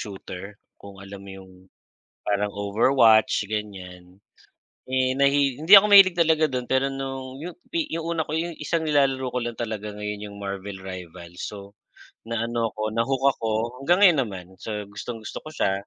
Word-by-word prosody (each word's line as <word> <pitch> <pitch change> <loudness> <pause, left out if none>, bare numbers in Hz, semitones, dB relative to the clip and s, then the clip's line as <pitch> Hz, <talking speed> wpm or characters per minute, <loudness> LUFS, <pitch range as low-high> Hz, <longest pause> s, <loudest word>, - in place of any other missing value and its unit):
Shooter, 95 -3 -8 0.4
kung 100 0 -11
alam 100 0 -10
mo 100 - -10
yung 95 0 -17 0.7
parang 105 0 0
Overwatch, 110 +2 +4 0.2
ganyan. 95 -4 -6 0.9
Eh, 130 0 +2
nahi 140 +1 +4 0.2
hindi 160 +5 0
ako 210 - +2
mahilig 190 -3 +8
talaga 160 -1 +3
dun 125 -1 -3
pero 130 +1 +3
nung 135 -1 -4 0.2
yu 175 - -5 0.2
pi 335 - 0
yung 165 -1 -3
una 160 -2 -1
ko - - -6
yung 170 -1 -6
isang 165 +2 0
nilalaro 135 -3 +2
ko - - +1
lang 120 -1 -5
talaga 110 -2 -4
ngayon 105 0 -5
yung 100 - -12
Marvel 100 0 -6
Rivals. 90 -1 -9
So, 105 - -9 0.7
na 115 -1 -1
ano 115 -1 -1
ako, 105 - -11
na-hook 130 +4 0
ako, 115 - -2 0.3
hanggang 175 +6 +3
ngayon 175 -7 +6
naman, 95 -6 -6 0.2
so, - - -6 0.2
gustong-gusto 110 +2 -7
ko 155 - -8
siya. 125 -10 0
115 Hz, 170 wpm, -24 LUFS, 100-140 Hz, 0.9 s, mahilig